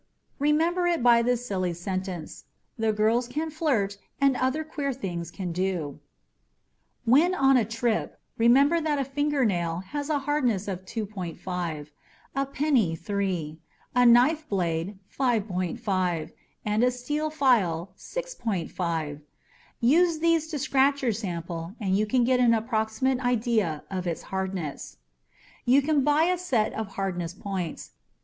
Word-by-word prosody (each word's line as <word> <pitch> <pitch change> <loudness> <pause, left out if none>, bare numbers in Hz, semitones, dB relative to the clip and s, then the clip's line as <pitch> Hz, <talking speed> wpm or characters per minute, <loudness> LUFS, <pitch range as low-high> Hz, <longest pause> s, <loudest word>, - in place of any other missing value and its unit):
Remember 325 +5 +2
it 340 -7 +1
by 235 -1 +6
this 245 0 0
silly 185 -5 -1
sentence: 185 -1 -5 0.3
"The 225 -1 +1
girls 220 +3 +2
can 310 +5 -3
flirt 230 -11 0 0.2
and 275 -1 +4
other 260 +5 0
queer 290 -3 -3
things 175 -8 -5
can 180 0 -5
do." 175 -5 -2 1.1
When 310 +10 +5
on 270 -4 +4
a 240 -4 +4
trip, 225 +1 -1 0.2
remember 275 +8 +4
that 305 -2 0
a 275 - 0
fingernail 250 - 0
has 290 +1 -3
a 300 - +2
hardness 265 -8 0
of 190 -1 -4
2.5; 180 -7 -4 0.5
a 275 0 +1
penny, 270 - +1
3; 170 -4 -3 0.3
a 250 - +4
knife 255 +7 +5
blade, 175 0 -1 0.2
5.5; 190 - -1 0.3
and 210 +2 +1
a 250 - +5
steel 295 +5 -2
file, 205 - +2
6.5. 175 - -3 0.6
Use 325 +7 +4
these 330 -1 +2
to 315 -2 -4
scratch 275 0 +2
your 240 - +3
sample 170 -3 -5
and 190 -3 0
you 215 +2 +1
can 250 +2 +2
get 250 +1 +3
an 235 -2 +5
approximate 220 +3 0
idea 225 - +1
of 185 -2 -3
its 170 - -3
hardness. 190 -6 -4 0.7
You 265 +3 +4
can 295 -1 +2
buy 295 +2 +4
a 360 +1 +1
set 250 -12 0
of 220 -1 -3
hardness 180 -3 -2
points. 190 -4 -5
225 Hz, 140 wpm, -26 LUFS, 185-275 Hz, 1.1 s, by